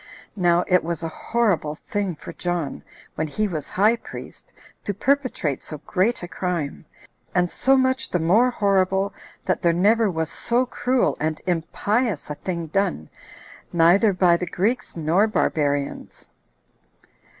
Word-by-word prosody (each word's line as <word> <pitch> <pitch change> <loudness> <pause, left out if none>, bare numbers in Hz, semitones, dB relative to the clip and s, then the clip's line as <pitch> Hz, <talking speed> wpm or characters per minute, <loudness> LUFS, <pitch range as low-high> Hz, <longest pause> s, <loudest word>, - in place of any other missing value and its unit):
Now 175 -3 +3
it 180 -1 +3
was 170 0 -3
a - - -1
horrible 200 -10 0
thing 195 +1 -3
for - - -10
John, 175 -5 -3 0.3
when 155 - -2
he 215 +8 -1
was 155 -7 -4
high 215 +5 +3
priest, - - -10 0.3
to 205 - -3
perpetrate 255 - 0
so 155 - -7
great 200 +3 +1
a - - -4
crime, 175 -5 -3 0.5
and 180 -1 +2
so 270 +1 +3
much 260 0 +1
the - - +1
more 195 +10 +4
horrible, 195 -3 +1 0.3
that 185 - 0
there 170 -1 +3
never 210 +5 +3
was 160 -2 -2
so 240 +2 +1
cruel 250 0 0
and 155 0 -1
impious 185 - -1
a - - -1
thing 170 +3 -4
done, 170 - -1 0.6
neither 175 +6 +5
by 180 -2 +4
the 180 - -4
Greeks 210 +4 -1
nor 165 +7 +3
Barbarians. 145 -9 -1
180 Hz, 145 wpm, -23 LUFS, 165-215 Hz, 0.6 s, neither